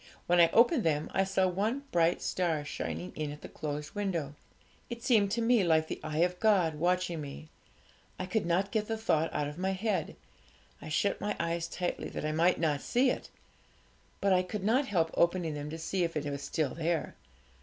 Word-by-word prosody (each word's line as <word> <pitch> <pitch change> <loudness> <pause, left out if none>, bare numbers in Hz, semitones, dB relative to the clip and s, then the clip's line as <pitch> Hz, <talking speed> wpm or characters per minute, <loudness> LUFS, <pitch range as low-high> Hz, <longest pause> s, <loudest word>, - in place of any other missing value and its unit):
When 175 0 +3
I 170 -1 +7
opened 240 +2 +4
them 155 -2 0
I 195 - +3
saw 190 0 +1
one 215 +9 -1
bright 170 0 +2
star 165 -5 0
shining 85 - -4
in 155 -1 -3
at 150 - -9
the - - -8
closed 150 0 -5
window. 175 -9 -2 0.6
It 235 -1 -6
seemed 220 -6 +4
to 230 0 0
me 230 -3 +4
like 160 -2 +3
the - - -5
eye 155 +2 +1
of 180 0 -4
God 190 -7 +3
watching 175 +1 0
me; 145 +2 -8 0.7
I 185 - -3
could 190 0 -1
not 190 +3 +1
get 215 -2 0
the 225 - -2
thought 165 -7 +1
out 145 - -1
of 150 +3 -7
my 190 0 -1
mind. 215 -4 -1 0.7
I - - -8
shut 200 +6 0
my 210 - -1
eyes 170 0 -1
tightly, 175 +1 -3
that - - -5
I 155 - 0
might 170 +3 +3
not 150 -4 +1
see 255 +1 +2
it; - - -5 0.9
but 195 -1 +3
I 180 - +4
could 190 +2 -5
not 255 +7 +2
help 165 -5 +1
opening 170 -2 +1
them 145 0 -5
to 160 - -5
see 175 +3 -1
if 165 -2 -1
it 150 - -3
was 140 -1 -3
still 140 0 -1
there. 165 0 -1
175 Hz, 210 wpm, -31 LUFS, 155-200 Hz, 0.9 s, I